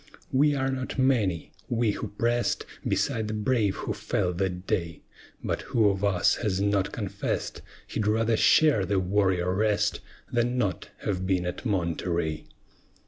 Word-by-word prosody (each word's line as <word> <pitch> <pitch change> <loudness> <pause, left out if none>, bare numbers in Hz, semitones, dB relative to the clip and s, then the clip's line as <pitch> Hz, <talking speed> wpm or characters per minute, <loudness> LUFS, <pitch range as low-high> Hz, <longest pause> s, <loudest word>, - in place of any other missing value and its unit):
We 145 +2 +3
are 135 -1 0
not 130 -1 -4
many 115 - +1 0.2
we 115 -2 +2
who 105 - -4
press'd 120 +4 0 0.2
Beside 110 -2 0
the 110 - -3
brave 105 -2 +1
who - - -3
fell 90 - -1
that 90 0 -2
day 85 -4 -2 0.4
But - - -1
who 110 -3 +2
of 100 0 -2
us 95 -4 +3
has 100 -5 -1
not 100 -1 +1
confess'd - - -3 0.2
He'd 105 - -2
rather 110 +1 +2
share 145 -2 +5
their 95 +2 0
warrior 95 -1 +1
rest 105 +1 +1 0.3
Than 120 +1 +1
not 100 -7 -1
have 95 -2 -2
been 90 -2 +1
at 90 +7 -4
Monterey? 85 -4 -1
100 Hz, 150 wpm, -27 LUFS, 95-115 Hz, 0.4 s, share